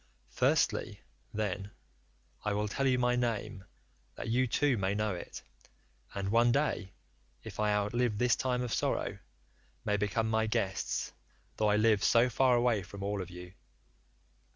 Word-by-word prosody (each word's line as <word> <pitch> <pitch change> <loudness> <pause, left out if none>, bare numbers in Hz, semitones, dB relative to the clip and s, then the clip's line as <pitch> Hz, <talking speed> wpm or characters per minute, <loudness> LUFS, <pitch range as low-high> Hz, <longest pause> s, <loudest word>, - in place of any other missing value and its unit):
"Firstly, - - +1 0.3
then, 100 -2 -3 0.7
I 105 - 0
will 105 +1 0
tell 135 +6 0
you 130 -1 +3
my 125 0 +2
name 110 -5 -2 0.5
that - - -5
you 125 +3 +2
too 140 +3 +2
may 100 -1 0
know 105 -1 0
it, 90 - -8 0.7
and 100 -1 -2
one 120 +2 +4
day, 115 -8 0 0.5
if - - -9
I 105 -1 +2
outlive 105 +2 +1
this 125 +1 +3
time 125 -1 -1
of 120 - -3
sorrow, - - -1 0.7
may 105 0 +1
become 105 +2 0
my 110 0 +1
guests 110 -4 -1 0.4
though 105 - +2
I 105 - +4
live 105 -1 +3
so 120 +2 +4
far 130 0 +4
away 120 -3 +2
from 100 +2 -9
all 100 0 -1
of 90 - -7
you. 90 0 -10
110 Hz, 155 wpm, -31 LUFS, 100-120 Hz, 0.7 s, one